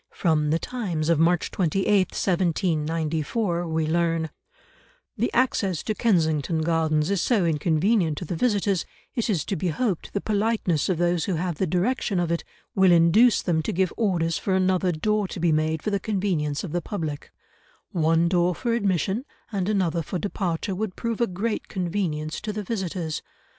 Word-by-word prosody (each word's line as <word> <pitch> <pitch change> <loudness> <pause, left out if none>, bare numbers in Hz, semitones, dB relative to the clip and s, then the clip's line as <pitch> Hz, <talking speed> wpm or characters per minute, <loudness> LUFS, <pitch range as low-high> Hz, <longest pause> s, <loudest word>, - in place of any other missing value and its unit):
From 155 -4 +1
The 160 - +3
Times 175 -8 -3
of 165 -3 +3
March 170 +1 +2
28, 190 +1 0 0.2
1794, 170 +1 0
we 160 -1 0
learn, 165 -1 0 0.8
"the 235 +1 0
access 200 - +1
to 215 - -1
Kensington 160 - +1
Gardens 160 0 +1
is 195 -3 +1
so 215 -8 +2
inconvenient 165 +2 +1
to 175 - -5
the 170 - -3
visitors, 200 -3 +1 0.3
it 235 -1 -1
is 175 -8 0
to 195 - -2
be 180 - -2
hoped 185 +2 -1
the 200 - 0
politeness 205 -7 0
of 185 - +1
those 175 -1 +1
who 190 - -1
have 175 -1 -2
the 190 - +1
direction 190 +3 0
of 175 -1 0
it 170 - -1 0.3
will 190 -2 +5
induce 175 +8 +5
them 165 -3 +1
to - - -2
give 185 +1 0
orders 175 -7 0
for 190 - 0
another 185 -1 +2
door 210 +5 0
to 180 - -7
be 170 -1 +2
made 155 0 0
for 210 - -1
the 200 - +1
convenience 185 -9 -1
of 185 - -5
the 175 +1 -1
public; 160 -9 -5 0.6
one 165 0 +2
door 175 0 +2
for 235 -2 -1
admission, 200 - 0 0.3
and 195 -2 -1
another 180 -5 +1
for 170 +4 -4
departure 190 -1 -2
would 200 0 -3
prove 230 -1 -3
a 235 - +3
great 205 +5 -3
convenience 170 -5 -2
to 215 - -3
the 210 0 -4
visitors. 180 -6 -3
175 Hz, 175 wpm, -25 LUFS, 160-200 Hz, 0.8 s, will